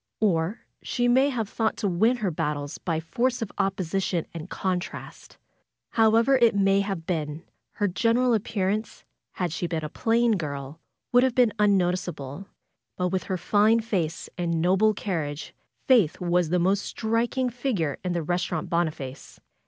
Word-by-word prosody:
Or 190 0 +1 0.2
she 245 0 0
may 260 +3 +4
have 230 -6 -2
thought 220 +1 -1
to 205 - -1
win 220 +7 +2
her 205 -6 -1
battles 150 -2 -3
by 165 -3 -2
the 160 - -6
force 245 +5 0
of 205 - -7
opposition 190 -2 -1
and 165 +1 -7
contrast. 185 -1 -4 0.5
However 230 +4 +4
it 235 -3 +4
may 195 0 +3
have 195 -5 -4
been, 155 -2 -3 0.3
her 205 - 0
general 235 +6 +2
appearance, 210 0 -1 0.3
had 175 -4 -2
she 175 - -2
been 165 -2 -3
a - - -5
plain 230 +3 +2
girl, 140 -2 -5 0.3
would 245 - +6
have 255 -1 +1
been 245 -4 +4
unnoticeable, 180 -5 0 0.5
but 180 0 0
with 185 -1 -2
her 185 - -2
fine 210 +5 +3
face 190 -8 -2
and 170 -2 0
noble 190 +5 +3
carriage 160 -8 -4 0.3
Faith 230 - +4
was 175 -2 +1
the 180 - +2
most 190 +3 +2
striking 235 +4 -1
figure 225 - -2
in 180 -1 -1
the 170 -2 -1
Resturant 175 -1 -2
Boniface. 155 -6 -3
190 Hz, 160 wpm, -26 LUFS, 165-225 Hz, 0.5 s, would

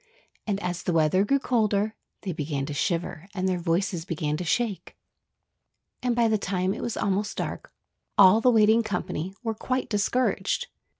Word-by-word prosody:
And 200 -2 0
as 180 0 -2
the 180 - -1
weather 165 +4 +3
grew 275 +7 +2
colder, 215 -5 +1 0.3
they 195 - -2
began 145 -3 -3
to 150 - -5
shiver 170 +2 -2
and 185 0 0
their 185 -1 0
voices 170 0 0
began 155 -3 -2
to 180 - -4
shake. 205 +3 -2 1.0
And 245 -2 0
by 235 -1 +3
the 220 -1 +1
time 185 -1 -1
it - - -6
was 235 - -3
almost 205 +1 -1
dark - - -4 0.5
all 205 +2 +7
the 250 - +5
waiting 220 -1 +5
company 190 -3 -3
were 225 -1 -1
quite 255 +4 -2
discouraged. 250 - 0
195 Hz, 170 wpm, -26 LUFS, 175-220 Hz, 1.0 s, all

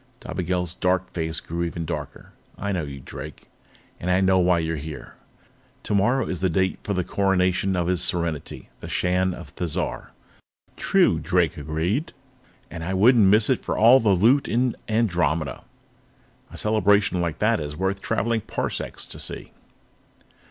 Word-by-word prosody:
Dobigel's 90 -1 -3
dark 90 0 0
face 80 -2 -1
grew 85 +2 -5
even 85 -1 -3
darker. - - -6 0.3
"I 100 +1 -3
know 90 -3 -1
you, 70 -2 -7
Drake. - - -9 0.5
And 90 - -3
I 90 +1 +3
know 95 -1 +3
why 90 -1 +3
you're 80 -1 -1
here. 75 -1 -8 0.7
Tomorrow 110 +5 +2
is 90 - -3
the 95 - +1
date 95 +3 0
for 100 - -2
the 90 - 0
Coronation 95 0 +1
of 90 -1 0
His 90 0 +1
Serenity, 85 -5 -2
the - - -8
Shan 90 0 0
of 85 -4 -10
Thizar." 85 -4 -3 0.7
"True," - - +3
Drake - - +1
agreed. 80 - -2 0.6
"And 80 0 -6
I 95 +3 -2
wouldn't 110 +1 +5
miss 105 +2 +5
it 130 - +1
for - - -2
all 120 +4 +7
the 110 - +1
loot 115 +9 +4
in 125 +1 +1
Andromeda. 85 - 0 0.9
A - - -10
celebration 105 -3 +2
like 85 -3 -2
that 110 0 +2
is 75 -1 -5
worth 95 +2 -1
traveling 115 0 0
parsecs - - -4
to - - -10
see." - - -5
90 Hz, 160 wpm, -24 LUFS, 85-105 Hz, 0.9 s, all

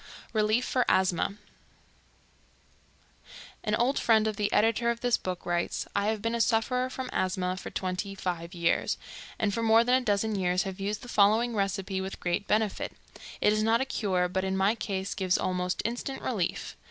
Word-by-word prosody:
Relief 215 +3 +2
for 255 - +2
Asthma. 190 +1 +2 2.3
An 210 -1 +1
old 245 +5 +1
friend 220 -2 +4
of 215 -1 -1
the 205 0 -1
editor 230 +2 +3
of 235 0 -2
this 245 -1 +3
book 180 -1 -5
writes: 175 0 -1
"I 200 0 +1
have 215 -1 -1
been 230 0 0
a 235 - +1
sufferer 250 +3 +1
from 260 0 -5
asthma 185 0 0
for 185 - -7
twenty 185 +2 -3
five 175 -2 -4
years, 170 -1 +1 0.4
and 210 -2 0
for 230 - -1
more 225 0 +5
than 250 +2 +3
a - - -8
dozen 215 -1 +1
years 180 -2 +1
have 190 -1 -6
used 205 +1 -3
the - - -9
following 225 +2 +3
recipe 195 -1 -1
with 190 0 -6
great 175 +3 -1
benefit. 215 -1 0 0.5
It 210 - +4
is 215 - +1
not 225 +2 +3
a 265 - 0
cure, 185 -8 0
but 190 +1 -2
in 190 0 -1
my 195 +3 +3
case 195 -4 -3
gives 185 -2 +1
almost 180 0 -1
instant 245 +4 -3
relief. 200 -9 -2
205 Hz, 185 wpm, -28 LUFS, 190-230 Hz, 2.3 s, more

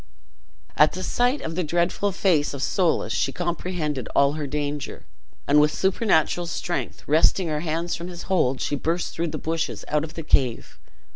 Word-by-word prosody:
At 150 - +5
the 185 - -5
sight 245 +7 +1
of 160 - -4
the 180 +2 -1
dreadful 175 +5 0
face 170 -7 +1
of 140 - -4
Soulis 170 - +1
she 135 - 0
comprehended 170 -5 -3
all 140 0 +4
her 150 -2 -3
danger, 145 0 -4 0.4
and 150 +1 +6
with 150 0 +3
supernatural 180 -3 +1
strength, 175 +1 -3
wresting 165 +3 +3
her 150 -1 -1
hands 165 +2 -2
from 170 - -6
his 175 -1 -8
hold, 135 -9 +1
she 145 - 0
burst 165 +5 -2
through 170 +1 -1
the 155 -1 -4
bushes 160 +2 -3
out 150 0 +1
of 155 - -8
the 165 - -5
cave. 125 -6 0
160 Hz, 180 wpm, -24 LUFS, 150-175 Hz, 0.4 s, and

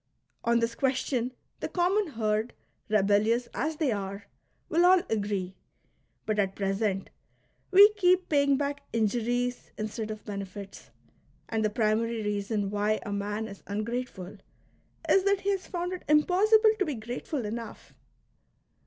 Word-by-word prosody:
On 235 0 +3
this 230 0 0
question 255 -1 0 0.3
the - - -3
common 360 -1 +1
herd, 215 +1 -1 0.4
rebellious 215 +3 +2
as 310 +5 -1
they 300 -4 0
are, 200 0 -4 0.4
will 335 +2 +2
all 365 0 +6
agree, 200 -4 -1 0.7
but 215 -1 0
at 195 -1 0
present 195 0 -1 0.6
we 405 +2 +8
keep 365 -2 +3
paying 280 -2 +3
back 285 0 -2
injuries 240 +3 0
instead 215 +1 -4
of 215 0 -7
benefits, 200 -1 -7 0.6
and 220 -1 0
the 215 - +2
primary 225 +1 0
reason 205 0 -1
why 210 +1 +1
a 205 - -3
man 205 +2 -2
is 200 - -10
ungrateful 215 -2 -4 0.7
is 385 - +4
that 400 -1 +2
he 400 - +1
has 390 -1 -2
found 355 0 -3
it 365 - -5
impossible 415 +8 +5
to 390 - +2
be 300 -4 -3
grateful 240 +4 -4
enough. 230 +2 -7
230 Hz, 140 wpm, -28 LUFS, 210-300 Hz, 0.7 s, we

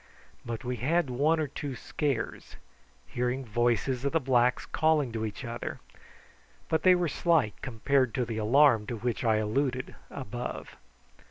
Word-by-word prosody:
But 115 +1 -5
we 125 0 -3
had 155 +3 +1
one 150 +6 +2
or 155 - +1
two 140 -1 -5
scares: 135 -3 -3 0.5
hearing 125 +2 -2
voices 120 +3 0
of 140 - -1
the 165 - +4
blacks 125 -3 +2
calling 155 -5 +1
to 110 -1 -2
each 105 - -7
other, 120 0 -5 0.9
but 160 - +1
they 185 -1 +6
were 180 -1 +1
slight 150 - +2
compared 130 +1 +1
to 125 - 0
the 115 -1 -4
alarm 115 -1 +4
to 120 - -3
which 120 +2 -2
I 110 -2 +3
alluded 130 +4 -1 0.2
above. 120 -2 -6
125 Hz, 155 wpm, -29 LUFS, 115-140 Hz, 0.9 s, they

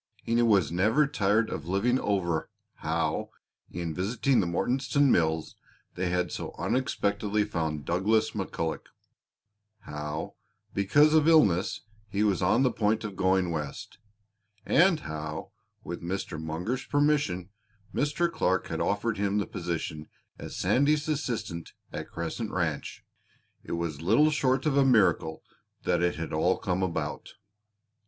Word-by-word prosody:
He 115 +1 +2
was 100 -9 +3
never 110 - +3
tired 110 -4 +1
of 75 - -5
living 115 +8 +2
over 90 -5 -1 0.3
how, - - -1 0.4
in 85 -2 -4
visiting 115 - +1
the 95 - +1
Mortonstown 130 - +2
mills, 80 -1 +1 0.4
they 90 0 -2
had 90 0 0
so - - -5
unexpectedly 105 -5 0
found 80 -7 -3
Douglas 110 +6 +2
McCulloch; 90 -5 -3 0.9
how, 75 -2 -5 0.4
because 145 +11 +4
of 155 -1 +4
ill 160 -2 +7
health, 90 -1 -2 0.3
he 100 +1 0
was 100 -4 +1
on 100 +8 +3
the 130 - +3
point 110 0 +1
of 105 -3 -5
going 95 -1 +2
West; 75 +4 -5 0.7
and 170 0 +4
how, 75 +3 -6 0.3
with 85 - -6
Mr. 85 -2 -4
Munger's 90 +12 -3
permission, 145 -12 +1 0.4
Mr. 150 +4 +1
Clark 95 - 0
had - - -2
offered 105 +1 0
him 100 0 +1
the 105 - +1
position 85 -3 -4 0.3
as - - -7
Sandy's 145 +3 +2
assistant 115 - -3 0.2
at - - -5
Crescent 85 +7 -4
Ranch. 85 -7 -3 0.6
It - - -6
was 85 -3 -3
little 115 - +4
short 135 -3 +1
of 150 -3 +2
a 140 - +5
miracle 100 -10 +3 0.4
that - - +1
it 90 0 +1
had 80 +1 -5
all 85 +4 +2
come 95 -3 -1
about! 80 -5 -3
100 Hz, 140 wpm, -28 LUFS, 85-125 Hz, 0.9 s, ill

